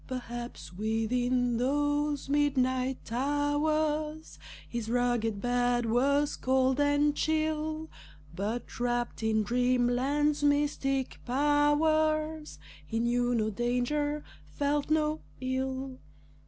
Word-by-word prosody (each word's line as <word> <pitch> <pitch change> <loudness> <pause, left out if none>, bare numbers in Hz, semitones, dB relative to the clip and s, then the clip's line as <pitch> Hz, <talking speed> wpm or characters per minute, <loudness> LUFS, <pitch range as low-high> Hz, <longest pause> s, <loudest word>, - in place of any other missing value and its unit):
Perhaps 240 -7 -6
within 240 +4 0
those 290 +3 0
midnight 260 -4 0
hours 300 +3 0 0.3
His 235 -2 -4
rugged 240 -3 0
bed 245 +1 +1
was 280 +5 +2
cold 260 +1 +1
and 290 0 +3
chill, 315 0 -1 0.5
But 215 +7 -4
wrapped 240 -1 -1
in 220 -1 +1
Dreamland's 250 +5 +1
mystic 285 -2 +1
powers, 305 +3 +1 0.3
He 225 - -3
knew 245 +1 +1
no 220 -1 0
danger, 250 +7 -1 0.3
felt 285 - -1
no 310 0 +1 0.2
ill. 260 0 -3
265 Hz, 90 wpm, -29 LUFS, 245-295 Hz, 0.5 s, and